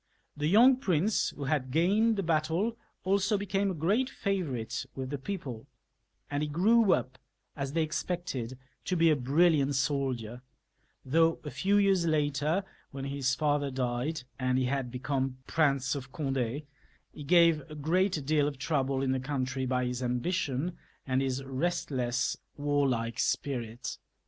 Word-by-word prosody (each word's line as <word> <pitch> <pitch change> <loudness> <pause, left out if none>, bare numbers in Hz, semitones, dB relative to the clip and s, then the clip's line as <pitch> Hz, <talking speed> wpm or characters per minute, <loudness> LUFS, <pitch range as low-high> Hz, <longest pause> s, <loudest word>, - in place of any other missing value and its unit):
The 150 0 -1
young 240 +9 +6
prince 195 - +1
who 145 - -7
had 135 -2 0
gained 200 - +3
the 195 - -1
battle 165 +7 0 0.3
also 200 +2 +2
became 200 0 0
a 185 - -2
great 205 - +1
favourite 155 - -2
with 130 0 -5
the 145 - -3
people, 135 - -6 0.6
and 145 0 -2
he 150 - -1
grew 205 +7 +4
up, 130 0 -2 0.4
as 140 -1 -4
they 165 0 +2
expected, 155 -6 -3 0.3
to 185 - 0
be 165 -1 +5
a - - +4
brilliant 145 +1 +3
soldier, 130 -4 -1 0.6
though 165 +4 +3
a 150 - -6
few 200 +2 +2
years 195 -4 +3
later, 150 +3 +1 0.3
when 135 0 -6
his 135 -2 0
father 145 -1 +1
died, 130 +3 -2 0.2
and 130 0 +1
he 130 - +1
had 135 -1 -1
become 130 +1 -2
Prince 140 -5 +1
of 135 -2 -6
Cond6, 135 -1 -2 0.5
he 150 - -8
gave 170 0 +5
a 155 - -8
great 165 +1 +1
deal 150 0 +2
of 145 -2 -4
trouble 135 -1 0
in 130 - +1
the 130 - 0
country 130 -1 -2
by 125 0 0
his 125 0 -3
ambition 135 +5 -1 0.3
and 130 0 +1
Ins 135 0 -1
restless, 135 -4 -1 0.2
warlike 135 -6 0
spirit. 120 -3 -2
145 Hz, 155 wpm, -30 LUFS, 130-170 Hz, 0.6 s, young